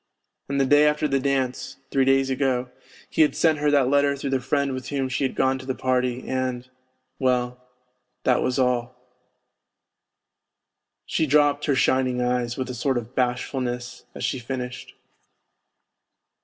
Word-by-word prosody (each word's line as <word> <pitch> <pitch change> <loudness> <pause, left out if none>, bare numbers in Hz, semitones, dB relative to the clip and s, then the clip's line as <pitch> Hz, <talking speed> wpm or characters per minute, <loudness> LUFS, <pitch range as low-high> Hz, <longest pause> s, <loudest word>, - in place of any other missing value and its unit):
And 140 0 0
the 135 - +3
day 145 +2 +5
after 150 0 +1
the 135 -1 +1
dance 130 -1 -2
(three 135 -1 +3
days 135 0 +3
ago) 130 -2 0 0.4
he - - 0
had 150 - +4
sent 160 -2 +2
her 150 0 +2
that 140 -3 +3
letter 140 +1 +2
through 140 0 -4
the 135 - +1
friend 140 +1 0
with 130 -2 -6
whom 135 -2 -1
she 130 - -1
had 130 - -1
gone 130 0 +1
to 130 - -10
the 130 - -1
party... 125 -1 -1
and... 130 -1 -2 0.5
well, 125 -1 0 0.6
that - - +3
was 130 +1 0
all." 125 -1 0 2.1
She 160 - 0
dropped 145 0 +3
her 145 - +2
shining 130 -1 +2
eyes 125 -1 -1
with 130 -1 -3
a - - -6
sort 130 +2 0
of 120 +1 -6
bashfulness 125 -1 -2
as - - -6
she 130 - -1
finished. 125 0 -6
130 Hz, 160 wpm, -24 LUFS, 125-140 Hz, 2.1 s, day